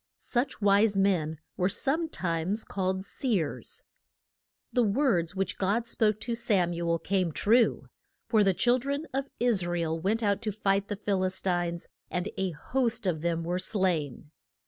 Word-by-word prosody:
Such 245 -3 -2
wise 200 +1 +4
men 175 -6 +1 0.2
were 180 +1 +2
some 295 - +1
times 180 - -2
called 190 0 -2
seers. 205 - -2 0.9
The 250 - +3
words 200 - +1
which 195 0 -2
God 210 +5 0
spoke 215 -2 +1
to 235 - -2
Sam 200 -7 +1
u 170 0 -2
el 170 - +2
came 185 -1 0
true; 225 +8 +3 0.4
for 220 -3 +4
the 195 -2 +2
chil 245 +5 +3
dren 280 +4 -3
of 275 +1 -2
Is 235 -6 +2
ra 175 0 -1
el 165 -1 -1
went 215 +7 0
out 200 0 +1
to 220 -2 -1
fight 195 -1 0
the 205 - -3
Phil 195 -2 -1
is 185 0 +2
tines, 175 -2 -1 0.2
and 180 +3 -2
a 190 -1 -1
host 235 - -1
of 165 -5 0
them 170 0 -1
were 175 +2 -1
slain. 170 - -1
195 Hz, 170 wpm, -28 LUFS, 175-225 Hz, 0.9 s, wise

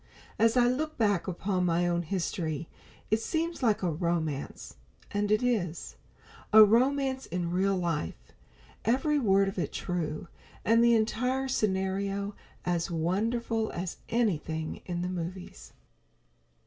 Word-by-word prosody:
As 230 +2 +4
I 240 -1 +5
look 305 +5 -1
back 205 -6 +1
upon 185 0 -1
my 175 0 +2
own 175 0 +1
history, 165 -3 -2 0.4
it 215 - +4
seems 330 +5 -2
like 220 -6 +2
a 175 - +1
romance. 160 -3 -3 0.3
And 205 0 0
it 215 +3 +3
is; 195 -9 -1 0.6
a 215 0 +10
romance 260 +4 +2
in 175 -1 -2
real 195 +2 +2
life; 150 - -3 0.5
every 275 +6 +2
word 195 -5 +3
of 195 -1 -3
it - - -2
true, 170 -2 -3 0.4
and 230 +2 +5
the 235 0 +6
entire 250 +4 0
scenario 200 -2 -1 0.3
as 175 -1 0
wonderful 220 +7 0
as 180 0 -4
anything 160 -9 -1
in 175 -1 -2
the - - -1
movies. 180 +1 -6
195 Hz, 135 wpm, -29 LUFS, 175-230 Hz, 0.6 s, a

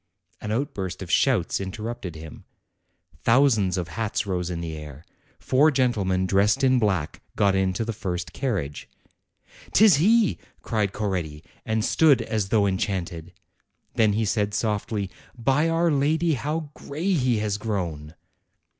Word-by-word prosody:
An 105 - -4
outburst 110 - -3
of - - -7
shouts - - +2
interrupted 100 -2 -5
him; 80 0 -10 0.8
thousands 115 -7 +3
of 85 -2 -3
hats 110 -1 -2
rose 90 -3 -2
in 85 -2 -4
the 80 -2 -5
air; 75 -1 -10 0.3
four 145 +4 +3
gentlemen 105 -10 +1
dressed 100 +6 +2
in 130 -1 +4
black 95 -9 -1
got 100 -1 +3
into 95 +3 0
the 115 - -3
first 90 -4 -4
carriage. 95 - -3 0.4
" - - -24
'Tis 205 -7 +6
he!" 215 +6 +3 0.2
cried 105 -4 0
Coretti, 90 -8 -3 0.2
and 110 0 0
stood 145 -3 +4
as 110 -4 -2
though 105 -2 +3
en 95 -1 0
chanted. 90 -4 -3 0.6
Then 110 -2 +3
he 110 +2 0
said 105 -1 0
softly, 105 -2 -2 0.3
"By 135 +7 +2
our 165 0 +2
lady, 155 +4 +2
how 150 +3 -3
gray 165 +7 -3
he 125 -7 +2
has 105 -1 -1
grown!" 85 -8 -4
105 Hz, 145 wpm, -24 LUFS, 95-130 Hz, 0.8 s, Tis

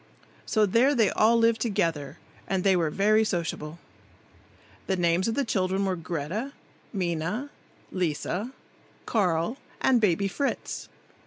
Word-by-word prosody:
So 215 -2 +3
there 240 +8 +3
they 225 -5 +3
all 225 +2 +4
lived 230 -1 +3
together, 165 - -1 0.3
and 190 -2 0
they 195 -1 +4
were 165 -3 +1
very 210 +6 +3
sociable. 165 -5 -3 1.1
The 190 - +1
names 175 +1 +2
of 225 - -1
the 280 -1 0
children 190 -2 0
were 190 -1 0
Greta, 175 - -4 0.4
Minna, 185 - -2 0.4
Lisa, 180 - -2 0.5
Carl 185 +1 +1 0.2
and 250 -3 +3
Baby 200 -1 +2
Fritz. 280 +8 -3
195 Hz, 130 wpm, -27 LUFS, 170-225 Hz, 1.1 s, all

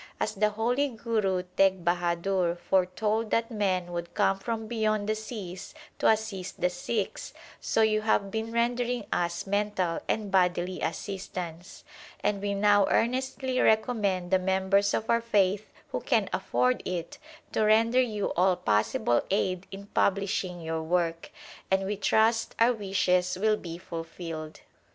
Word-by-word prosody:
As - - -1
the 210 +1 +2
holy 240 +7 0
Guru 215 -6 -1
Teg 190 -3 +3
Bahadur 175 +1 +1
foretold 190 +5 0
that 230 +2 0
men 185 -5 0
would 170 0 -5
come 195 0 +2
from 225 +1 -3
beyond 215 -2 0
the 215 - +2
seas 215 - -7 0.2
to - - +3
assist 215 -4 0
the 180 0 +1
Sikhs, 195 +3 -3 0.2
so 225 - +1
you 215 -1 +2
have 200 -2 +1
been 225 +1 -3
rendering 240 0 0
us 170 0 -1
mental 200 -4 0
and 210 -3 -1
bodily 180 -1 +1
assistance; 180 -3 -5 0.4
and 200 -1 0
we 200 0 -1
now 205 0 +4
earnestly 260 +1 0
recommend 210 -6 +2
the 190 - +4
members 190 +2 +2
of 225 - -2
our 235 0 +3
faith, 205 -3 +1 0.2
who - - -2
can - - +1
afford 250 0 +1
it, 170 -2 -4 0.3
to - - 0
render 225 +4 +4
you 215 -5 -1
all 185 +1 +4
possible 110 -1 +1
aid 185 -2 0
in 195 +1 -9
publishing 195 -3 0
your 160 0 -3
work, 165 0 -1 0.4
and 190 0 +2
we 205 +2 -1
trust 220 +3 +2
our 235 +2 +4
wishes 185 -4 +1
will 215 +1 +3
be 170 -5 -7
fulfilled. 165 -2 -7
195 Hz, 145 wpm, -28 LUFS, 180-220 Hz, 0.4 s, now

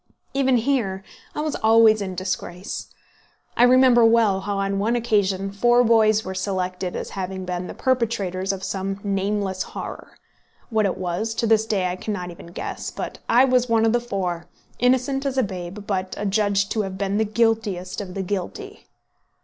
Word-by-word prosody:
Even 265 -2 +3
here, 225 -7 0 0.3
I - - -1
was 305 -1 -2
always 220 -1 +5
in 190 -2 -4
disgrace. 185 0 -4 0.7
I - - +1
remember 250 -1 +6
well 225 -4 +4
how, 200 +1 -3
on 195 0 -1
one 225 +4 +1
occasion, 200 -5 +1
four 240 +4 +4
boys 220 -2 +4
were 190 - -4
selected 185 -1 -3
as - - -5
having 190 -1 -4
been 180 0 -3
the - - -8
perpetrators 205 -7 0
of 190 -1 -6
some 195 +1 -3
nameless 200 -1 -1
horror. - - -7 0.5
What 215 -2 +2
it 185 - -3
was, 190 +5 -2
to 230 - 0
this 220 0 +3
day 195 -4 0
I 180 0 -2
cannot 185 -4 -4
even 170 - -12
guess; 170 - -5
but - - -6
I 250 +3 +6
was 250 -2 +2
one 225 -1 +3
of 225 - +3
the 240 - +2
four, 180 -7 -3 0.3
innocent 260 +2 +2
as 275 -1 -2
a 260 - +4
babe, 190 0 -6
but 190 -2 -2
adjudged 200 -1 +1
to 220 - +1
have 190 -2 -5
been 200 +1 -1
the - - +4
guiltiest 215 -4 0
of 185 -2 -8
the 195 - -2
guilty. 205 - -5
205 Hz, 180 wpm, -23 LUFS, 190-230 Hz, 0.7 s, remember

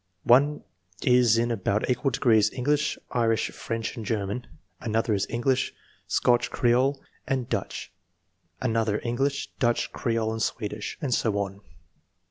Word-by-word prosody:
One 145 +5 +4 0.4
is 125 -3 +5
in 120 +1 +1
about 105 -1 0
equal 125 +2 +1
degrees 110 -4 +3
English, 145 +4 0
Irish, 115 -2 +1
French, 115 0 -4
and 115 - -6
German; 105 +2 -2 0.3
another 110 0 0
is 100 -1 0
English, 130 +2 0 0.3
Scotch 120 -1 +2
Creole, 130 +3 +2 0.3
and 130 -3 -1
Dutch; - - -3 0.7
another 110 -2 +1
English, 135 +4 -1
Dutch, 120 -2 +1
Creole, 115 -3 0
and 110 0 -3
Swedish; 105 -2 -3
and 135 -5 0
so 110 -3 +1
on. 100 0 -3
120 Hz, 130 wpm, -26 LUFS, 110-125 Hz, 0.7 s, is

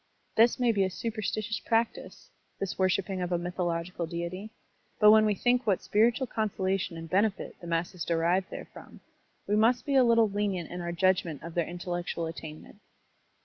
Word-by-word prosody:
This 230 +3 +4
may 245 -2 +3
be 200 -3 +2
a 190 - 0
superstitious 215 +1 -3
practice, 230 0 -2
— - - -43
^this 195 - -3
worshipit^ 185 0 0
of 180 - -4
a 175 - +2
mythological 175 -1 -3
deity; 170 +5 -5 0.5
but 210 -1 +8
when 215 0 +6
we 210 - +1
think 245 +4 +1
what 195 -3 +1
spiritual 235 +5 +2
conso 220 -4 -3
lation 190 -3 -1
and 165 0 -7
benefit 200 +4 0
the 175 - -8
masses 170 +1 -2
derive 170 +3 +1
therefrom, - - -11 0.4
we 205 - +1
must 230 +3 +3
be 280 - -1
a 265 -1 +6
little 230 -2 +4
lenient 200 -4 -2
in 175 0 -5
our 170 0 -3
judgment 170 -4 +1
of 165 0 -7
their 170 -1 0
intellectual 175 -1 -4
attainment. 160 +3 -9
190 Hz, 180 wpm, -29 LUFS, 175-215 Hz, 0.5 s, but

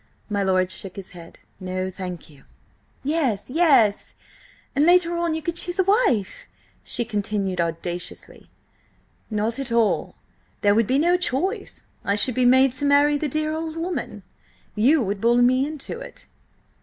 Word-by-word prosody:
My 205 -1 0
lord 185 -1 +1
shook 190 -1 -4
his 195 -2 -9
head. 170 -2 -13 0.2
"No, 185 0 -3
thank 180 -2 -7
you!" 145 -3 -19 0.6
"Yes, 270 -8 -1
yes! 275 -10 +3 0.6
And 285 - +3
later 345 0 +4
on 340 -2 -1
you 320 - -5
could 340 +1 -1
choose 355 +1 +1
a 380 - +3
wife!" 390 - +1 0.4
she 240 - -1
continued 200 -4 -2
audaciously. 170 +1 -5 0.8
"Not 220 +3 -2
at 270 -3 -4
all. 230 -2 +1 0.5
There 205 0 +4
would 225 0 +2
be 260 - +2
no 345 +4 +3
choice; 370 - -3 0.2
I 200 - 0
should 245 +5 +4
be 250 +1 +1
made 260 +1 +5
to 260 +3 -3
marry 285 +1 +4
the 300 - -2
dear 310 +2 -1
old 320 0 -4
woman. 330 - -4 0.5
You 260 +7 +3
would 200 -1 -3
bully 240 +1 +4
me 255 +3 +3
into 305 -2 -6
it." - - -11
250 Hz, 160 wpm, -23 LUFS, 200-315 Hz, 0.8 s, made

